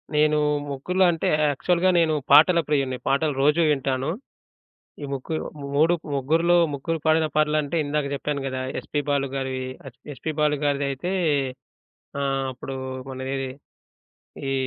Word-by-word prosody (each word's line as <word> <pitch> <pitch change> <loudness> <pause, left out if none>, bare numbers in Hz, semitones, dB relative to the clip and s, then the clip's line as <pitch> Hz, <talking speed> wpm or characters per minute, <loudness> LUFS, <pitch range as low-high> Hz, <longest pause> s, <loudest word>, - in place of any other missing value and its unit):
నేను 150 0 +4 0.3
ముగ్గురు‌లో 180 +7 +1
అంటే, 165 - -1 0.2
యాక్చువల్‌గా 175 +6 +1
నేను 160 -2 +3 0.2
పాటల 160 +5 +7
ప్రియుడిని. 135 -4 0
పాటలు 145 +2 +2
రోజు 150 +4 +4
వింటాను. 135 0 -1 0.9
ఈ - - -3
ముగ్గురు 140 +4 -3 0.4
మూడు 165 +4 +4 0.2
ముగ్గురిలో 160 +6 +2 0.2
ముగ్గురు 165 +4 -2
పాడిన 160 0 +4
పాటలంటే 155 +1 +1
ఇందాక 145 0 -1
జెప్పాను 140 0 -2
గదా! 130 -1 -3 0.2
ఎస్‌పి 145 - -3
బాలు 140 -1 +1
గారివి 130 -1 -3 0.2
yes 130 - -16
P - - -28
S 135 - -14
P 155 - +1
Balu 150 -1 +2
గారిదైతే 140 +3 -1 1.1
ఆహ్, 135 -1 0
అప్పుడు 130 +1 -7 0.3
మనదేది 130 0 -4 1.0
ఈ - - 0
145 Hz, 135 wpm, -24 LUFS, 135-155 Hz, 1.1 s, పాటల